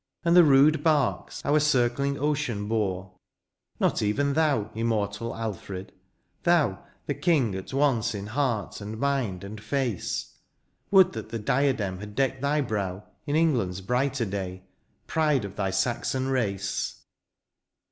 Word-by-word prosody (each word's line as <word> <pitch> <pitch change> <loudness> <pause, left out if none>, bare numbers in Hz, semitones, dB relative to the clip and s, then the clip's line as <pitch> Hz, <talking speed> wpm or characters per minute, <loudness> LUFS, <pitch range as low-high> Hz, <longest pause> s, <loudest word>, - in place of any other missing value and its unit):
And 170 +1 +4
the 175 - +9
rude 150 +1 +5
barks 150 -5 +1
our 150 +2 +4
circling 140 -1 +1
ocean 135 -8 -1
bore? 95 -4 -1 0.7
Not - - +1
even 140 +7 +1
thou, 140 -9 +1
immortal 110 0 -1
Alfred, 100 -3 -5 0.3
— - - -45
thou. 155 - +2 0.2
The 145 - -1
king 140 - +2
at 95 0 -6
once 125 -5 +1
in 100 -1 -5
heart, 115 -3 -2
and 105 +2 -6
mind, 130 -10 -1
and 105 +2 -8
face; 120 -3 -2 0.5
Would 190 -2 +6
that - - -6
the 115 - -3
diadem 110 -5 0
had 105 0 -9
decked 135 0 0
thy 145 +1 +1
brow 100 -6 -3 0.2
In 145 - 0
England's 120 - +1
brighter 125 +4 0
day, 95 -2 -5 0.4
pride 150 -7 +1
of 100 0 -8
thy 95 -1 -1
Saxon 120 +6 -1
rac^. 100 -6 -1
120 Hz, 140 wpm, -26 LUFS, 100-140 Hz, 0.7 s, the